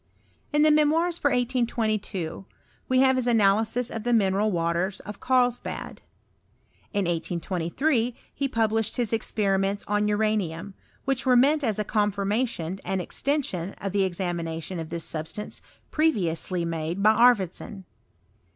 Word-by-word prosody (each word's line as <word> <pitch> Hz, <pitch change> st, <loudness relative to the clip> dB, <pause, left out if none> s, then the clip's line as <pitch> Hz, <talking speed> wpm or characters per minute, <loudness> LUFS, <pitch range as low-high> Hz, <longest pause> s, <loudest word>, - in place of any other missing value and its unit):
In 295 Hz, 0 st, +3 dB
the 310 Hz, -, +6 dB
Memoirs 320 Hz, +3 st, +3 dB
for 285 Hz, -, +2 dB
1822 220 Hz, -, -1 dB, 0.4 s
we 255 Hz, 0 st, +4 dB
have 265 Hz, -1 st, +4 dB
his 250 Hz, -1 st, 0 dB
analysis 225 Hz, +2 st, +2 dB
of 225 Hz, -, -4 dB
the 240 Hz, +2 st, 0 dB
mineral 205 Hz, -1 st, +2 dB
waters 170 Hz, +2 st, -1 dB
of 210 Hz, 0 st, -9 dB
Carlsbad. 250 Hz, -2 st, 0 dB, 0.9 s
In 200 Hz, -3 st, 0 dB
1823 180 Hz, -, -1 dB, 0.2 s
he 280 Hz, -, -1 dB
pub 225 Hz, -4 st, +1 dB
lished 225 Hz, -1 st, 0 dB
hia 245 Hz, -, +1 dB
experiments 200 Hz, -2 st, 0 dB
on 210 Hz, 0 st, +1 dB
uranium, 205 Hz, -4 st, -1 dB, 0.3 s
which 265 Hz, -2 st, -1 dB
were 250 Hz, -, +5 dB
meant 290 Hz, +4 st, +4 dB
as 220 Hz, -5 st, 0 dB
a 210 Hz, -, 0 dB
confirmation 205 Hz, -3 st, -1 dB
and 190 Hz, -, -1 dB
extension 195 Hz, -, -2 dB
of 195 Hz, -, -5 dB
the 195 Hz, -1 st, +1 dB
examinatt(»i 170 Hz, -1 st, -4 dB
of 160 Hz, -, -7 dB
this 170 Hz, -1 st, -4 dB
substance 160 Hz, +7 st, -5 dB, 0.3 s
previously 185 Hz, -, +1 dB
made 165 Hz, +3 st, -3 dB
by 215 Hz, +1 st, +6 dB
Arfvedson. 215 Hz, -4 st, +2 dB
210 Hz, 135 wpm, -26 LUFS, 185-245 Hz, 0.9 s, the